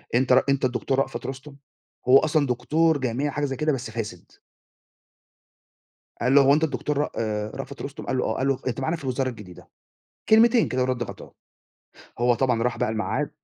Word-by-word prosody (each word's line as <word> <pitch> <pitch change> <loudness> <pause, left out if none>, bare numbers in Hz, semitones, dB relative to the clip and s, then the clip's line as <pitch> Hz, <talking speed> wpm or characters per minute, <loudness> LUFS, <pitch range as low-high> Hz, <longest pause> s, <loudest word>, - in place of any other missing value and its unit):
أنت 130 +1 +3
ر 130 - +6
أنت 140 -1 +2
الدكتور 130 +2 -1
رأفَت 135 -1 -2
رُستُم، 135 +2 -7 0.5
هو 130 +2 +8
أصلًا 155 -1 +1
دكتور 150 +6 +1
جامعي 130 +2 -1
حاجة 145 +1 -1
زي 135 -1 -3
كده، 150 +3 0
بس 125 -4 -4
فاسد. 105 -6 -6 1.9
قال 125 +3 +2
له: 140 - +8
"هو 140 +1 +5
أنت 155 +2 +2
الدكتور 145 -1 -1
رأ 145 - 0
آآ 105 -1 -2
رأفت - - -7
رُستم؟" - - -7
قال - - -1
له: - - 0
"آه." - - -2
قال 135 - 0
له: 135 -2 0
"أنت 130 0 -2
معانا 160 +5 -1
في 160 - -13
الوزارة 130 0 -1
الجديدة." 105 -7 -11 0.6
كلمتين 230 +1 +5
كده 130 0 0
وِرَد 125 -1 -1
غَطاه. 120 - -9 0.8
هو 120 +1 +3
طبعًا 120 -2 +1
راح 125 0 -1
بقى 125 -1 0
الميعاد 125 +6 -2
130 Hz, 190 wpm, -24 LUFS, 120-145 Hz, 1.9 s, هو